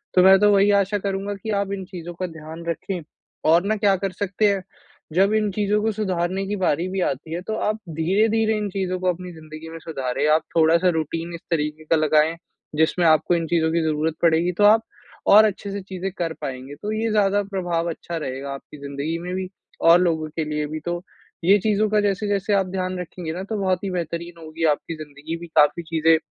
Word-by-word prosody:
तो 180 - +6
मैं 190 0 +8
तो 210 +1 +5
वही 200 +1 +5
आशा 200 +2 -1
करूँगा, 195 +1 -2
कि 210 +3 -8
आप 200 0 -4
इन 190 -1 -4
चीज़ों 175 -2 -8
का 185 +1 -3
ध्यान 160 0 -9
रखें 180 +2 -3 0.5
और 170 +2 +5
ना 215 +2 +1
क्या 200 -1 +3
कर 195 0 -2
सकते 200 +3 0
हैं। 195 -2 -4 0.5
जब 195 +5 +3
इन 215 -1 +1
चीज़ 205 +1 -1
को 215 +1 +1
सुधारने 190 -2 -1
की 210 - -1
बारी 180 -1 +1
भी 190 0 -2
आती 155 +4 -5
है, 175 - -3
तो 220 +4 -4
आप 215 0 -1
धीरे-धीरे 215 +7 +2
इन 210 -1 -2
चीज़ों 185 -1 -2
को 185 0 +1
अपनी 180 +1 -9
ज़िंदगी 155 0 -10
में 165 - -8
सुधारें। 135 -4 -2
आप - - -7
थोड़ा-सा 165 +3 +4
रूटीन 165 +3 -4
इस 170 - -9
तरीके 150 -1 -1
का 165 - +3
लगाएँ, 155 +1 +3 0.4
जिसमें 160 +3 +2
आपको 155 +2 +4
इन 165 -1 -1
चीज़ों 160 -1 +2
की 170 - +1
ज़रूरत 155 0 0
पड़ेगी 170 +1 +3
तो 205 - +3
आप 215 +2 +7 0.5
और 215 +2 +8
अच्छे 200 -1 -2
से 200 - -4
चीज़े 190 0 -5
कर 165 -2 -1
पाएँगे। 130 +1 -6
तो 210 - -3
ये 220 +1 -1
ज़्यादा 205 -1 +3
प्रभाव 175 -4 -2
अच्छा 170 +1 -5
रहेगा, 135 -2 -4
आपकी 140 +2 -10
ज़िंदगी 140 +3 -3
में 180 +1 -5
भी 185 -1 -3 0.3
और 170 +1 +7
लोगो 160 -3 +1
के 160 - 0
लिए 150 0 -1
भी। 155 +1 -5
तो 175 0 -2 0.4
ये 195 +4 +6
चीज़ों 215 +1 +1
का 210 0 +3
जैसे-जसे 205 0 0
आप 195 -2 +2
ध्यान 185 0 -3
रखेंगे 175 -1 -6
ना, 185 - -5
तो 215 +2 -4
बहुत 185 -1 0
ही 195 - -2
बेहतरीन 170 -1 -4
होगी 160 +1 -6
आपकी 165 +2 -7
ज़िंदगी 155 +1 -7
भी 170 0 -9
काफ़ी 150 +3 +4
चीज़ें 160 0 +3
175 Hz, 215 wpm, -23 LUFS, 160-200 Hz, 0.5 s, मैं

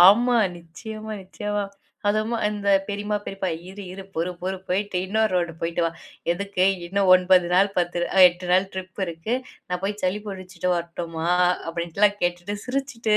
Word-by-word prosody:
ஆமா, 240 +4 +5 0.2
நிச்சியமா, 215 +6 -8
நிச்சியமா. 205 +2 -3 0.4
அதும் 215 +2 +1
அந்த 205 -1 -2 0.2
பெரியம்மா 205 +1 -1
பெரியப்பா 195 -1 -3 0.2
"இரு 205 +1 -8
இரு 195 - -7
பொறு 170 +3 0
பொறு 190 +1 -1
போயிட்டு 190 0 0
இன்னொரு 220 +2 +2
ரவுண்டு 170 -2 0
போயிட்டு 165 +1 0
வா, - - -1 0.4
எதுக்கு? 195 0 0 0.2
இன்னும் 195 +2 +1
9 185 -1 +5
நாள் 195 +2 +5
10 175 0 0 0.2
அ - - +5
8 180 +1 -8
நாள் 190 +2 +4
ட்ரிப் 185 +1 -6
இருக்கு. 170 +8 -3 0.3
நான் 180 0 -2
போய் 205 +1 -2
சளி 185 +2 +1
புடிச்சிட்டு 185 -2 -4
வரட்டுமா." 170 -1 -4 0.4
அப்டின்லாம் 175 +5 +1
கேட்டுட்டு 175 +3 -1
சிரிச்சிட்டு 250 -5 0
190 Hz, 155 wpm, -24 LUFS, 175-210 Hz, 0.4 s, ஆமா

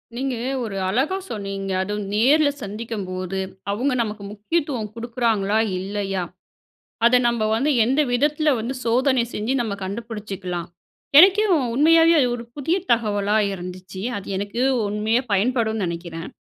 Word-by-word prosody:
நீங்க 260 +1 -2 0.3
ஒரு 205 -4 -4
அழகா 265 - 0
சொன்னீங்க. 195 -2 -4
அதுவும் 205 +1 -3
நேருல 285 +8 +4
சந்திக்கும்போது, 195 -3 -4 0.3
அவுங்க 250 +7 0
நமக்கு 210 -2 -4
முக்கியத்துவம் 235 +1 -2
குடுக்குறாங்களா? 230 -3 0 0.2
இல்லையா? 195 -1 -3 0.8
அத 240 +1 +6
நம்ப 235 -2 0
வந்து, 275 +7 +1
எந்த 265 +5 +2
விதத்துல 295 +4 +2
வந்து, 235 +4 -3
சோதனை 255 +2 +2
செஞ்சு, 220 +5 -1
நம்ம 220 -4 -2
கண்டுபிடிச்சிக்கலாம். 195 -4 -5 0.5
எனக்கே 385 +6 +8 0.3
உண்மையாவே 325 +5 +5
அது 255 - +3
ஒரு 235 - -7
புதிய 295 +5 0
தகவலா 210 -3 +1 0.2
இருந்துச்சு. 185 0 -8 0.2
அது 200 - -8
எனக்கு 205 +4 -3 0.3
உண்மையா 215 +4 +1
பயன்படும் 220 +1 +1
நெனைக்கிறேன். 170 -1 -5
220 Hz, 125 wpm, -22 LUFS, 195-255 Hz, 0.8 s, எனக்கே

